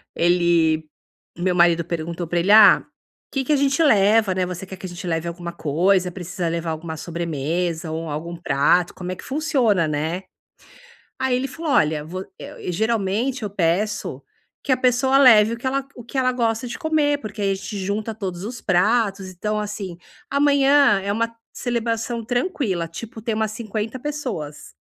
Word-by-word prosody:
ele 170 -3 +2 0.5
meu 180 0 0
marido 170 -1 +4
perguntou 170 0 -4
pra 175 +1 0
ele: 190 +4 +2
"Ah, 215 0 +8 0.5
que 270 -1 -1
que 300 - -2
a - - +5
gente 275 +2 +2
leva, 210 -5 +4
né? 185 -1 +1
Você 180 +1 -6
quer 190 0 -9
que 190 - -9
a - - -5
gente 175 +1 -8
leve 165 0 -1
alguma 170 0 -5
coisa? 180 +4 +1
Precisa 175 -1 -4
levar 165 0 -2
alguma 160 0 -5
sobremesa 165 +1 -3
ou 160 0 -4
algum 165 +4 -5
prato? 165 +3 +2
Como 180 0 -6
é 185 - -3
que - - -12
funciona?", 260 - +1
né. 160 +5 -2 1.0
Aí, 260 -1 +1
ele 260 +2 -1
falou: 315 +3 -4
Olha, 150 0 +2
vo 185 +3 -6
eu - - -9
e 180 - -4
geralmente 220 +5 0
eu 205 - -2
peço 200 +3 -1 0.4
que 275 - -1
a 255 - +4
pessoa 255 +1 +3
leve 225 -5 +7
o 235 - -4
que 250 - -10
ela 275 +1 0
g 270 - -21
o 240 - -10
que 240 - -7
ela 255 -1 +3
gosta 230 -1 -1
de 240 - -6
comer 305 -3 +1
porque 210 -3 -7
aí 195 -1 +1
a - - +2
gente 200 +1 -6
junta 205 +3 -2
todos 185 -4 -5
os 235 +2 -6
pratos. 195 +1 +1
Então, 210 +4 -3
assim 205 -4 -5 0.3
amanhã, 280 -5 +4
é 200 - -2
uma 230 +1 -1 0.2
celebração 235 -1 -2
tranquila. 245 - -1
Tipo, 220 +6 -9
tem 225 0 -2
umas 220 -1 -1
50 220 +1 -4
pessoas. 245 - -5
200 Hz, 185 wpm, -22 LUFS, 170-240 Hz, 1.0 s, Ah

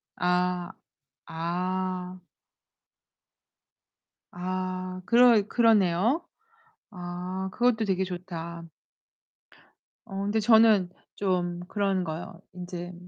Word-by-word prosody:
아. 180 0 0 0.6
아. 180 +2 -3 2.1
아, 185 0 -4
그러 235 -3 +5
그러네요. 225 - +3 0.7
아, 180 +1 -5
그것도 240 -3 +2
되게 190 -1 +1
좋다. 170 -2 -6 1.4
어 195 -3 -5
근데 205 +2 0
저는 220 -4 +5 0.3
좀 175 -3 -1
그런 195 -2 0
거요. 165 +1 -6
인제 180 0 -7
185 Hz, 135 characters per minute, -27 LUFS, 180-200 Hz, 2.1 s, 그러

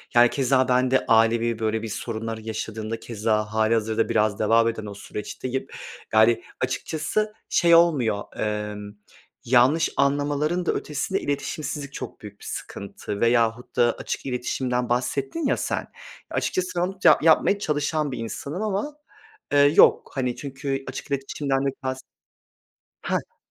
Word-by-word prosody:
yani 120 0 +7
keza 130 -1 +2
ben 125 0 +2
de 130 - +2
ailevi 115 0 +3
böyle 110 0 0
bir 115 - -4
sorunları 110 +1 -4
yaşadığımda 110 0 -4
keza 110 -1 -1
hâlihazırda 110 0 +1
biraz 110 -3 +1
devam 115 +2 +4
eden 110 -2 -3
o 100 - -6
süreçteyim. 125 +6 -5 0.5
Yani 110 +2 +4 0.2
açıkçası 210 +7 -1 0.2
şey 170 -1 +5
olmuyor, 135 -12 +3
emm, 105 -1 -3 0.5
yanlış 130 +6 +4
anlamaların 145 +5 +1
da - - +2
ötesinde 150 +6 -2
iletişimsizlik 145 0 -3
çok 130 - -7
büyük 105 -1 -11
bir - - -13
sıkıntı 100 +1 -6
veyahut 115 0 +1
da 120 -1 +4
açık - - -5
iletişimden 125 -1 -2
bahsettin 130 - -1
ya - - +1
sen, - - -2 0.4
açıkçası 185 0 -1
ben 175 - +2
onu 185 +1 -2
ta - - +6
yapmaya 165 +5 +4
çalışan 150 -2 -1
bir 125 - -4
insanım 140 - -5
ama, 215 +8 -2 0.6
eee, 145 - +5
yok 145 +2 +5
hani 125 -2 -1
çünkü 135 -1 -4
açık 135 - -6
iletişimden 135 0 -1
de - - +2
kast 130 0 -3 1.0
Hah. - - -3
125 Hz, 140 wpm, -24 LUFS, 110-145 Hz, 1.0 s, yani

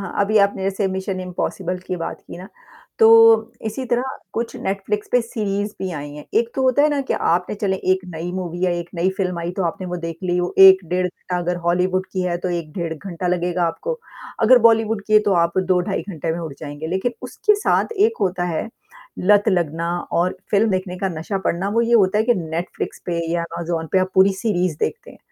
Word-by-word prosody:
हाँ। 195 +1 -2
अभी 215 +1 +2
आपने 200 -1 +2
जैसे 195 +1 0
मिशन 190 0 -3
इम्पॉसिबल 180 0 -3
की 185 - -2
बात 165 - -5
की - - -9
ना 185 +2 -10 0.5
तो 445 - +7 0.6
इसी 220 +5 -3
तरह 240 +2 0 0.3
कुछ 230 0 -3
नेटफ्लिक्स 200 +2 -3
पे 245 - +5
सीरीज़ 210 -3 -2
भी 190 - -2
आई 145 -2 -6
हैं। 150 - -9
एक 230 - +3
तो 265 - -1
होता 260 +2 +3
है 300 - +5
ना 290 -1 0
कि - - +1
आपने 175 +4 0
चले 195 -2 -1 0.2
एक 185 - 0
नई 165 +2 -4
मूवी 180 -1 -3
या 180 - +2
एक 170 - -6
नई 175 +2 +1
फ़िल्म 180 -3 -1
आई 170 0 -3
तो 195 - 0
आपने 175 +2 -3
वो 180 0 -3
देख 165 -1 -5
ली 180 -1 0
हो 180 0 -1
1 190 0 +10
डेढ़ 180 +1 +1
घंटा 180 0 -5
अगर 175 0 -1
हॉलीवुड 185 +2 +1
की 185 -1 -1
है 175 -1 -1
तो - - +1
1 170 -3 -4
डेढ़ 170 -3 -3
घंटा 180 +2 -6
लगेगा 175 0 0
आपको। 475 - -3 0.4
अगर 250 +3 +7
बॉलीवुड 225 -2 +2
की 215 - -3
है 215 - +9
तो - - +3
आप 170 +3 -1
2 185 -1 +2
ढाई 190 0 -2
घंटे 165 -3 -3
में 165 - -4
उठ 160 -4 -6
जाएँगे 145 +1 -6
लेकिन 190 +8 -1
उसके 420 - +1
साथ 415 +2 +1
एक 440 +3 +3
होता 180 -1 0
है, 175 +5 -2 0.5
लत 205 +3 +4
लगना 170 -3 0 0.2
और 175 +2 +1
फ़िल्म 215 +2 +3
देखने 185 -1 -2
का 195 - -1
नशा 195 +5 -3
पड़ना, 190 0 -1
वो 220 +3 +1
ये 235 +1 +2
होता 205 -2 +4
है 220 - +2
कि 240 +1 +3
नेटफ्लिक्स 170 -1 -4
पे 170 -1 -1
या 170 0 0
अमेज़न 170 -1 -3
पे 190 - +4
आप 185 0 0
पूरी 190 +1 +5
सीरीज़ 185 -5 -1
देखते 455 - -3
हैं, - - -16
185 Hz, 230 wpm, -21 LUFS, 175-205 Hz, 0.6 s, 1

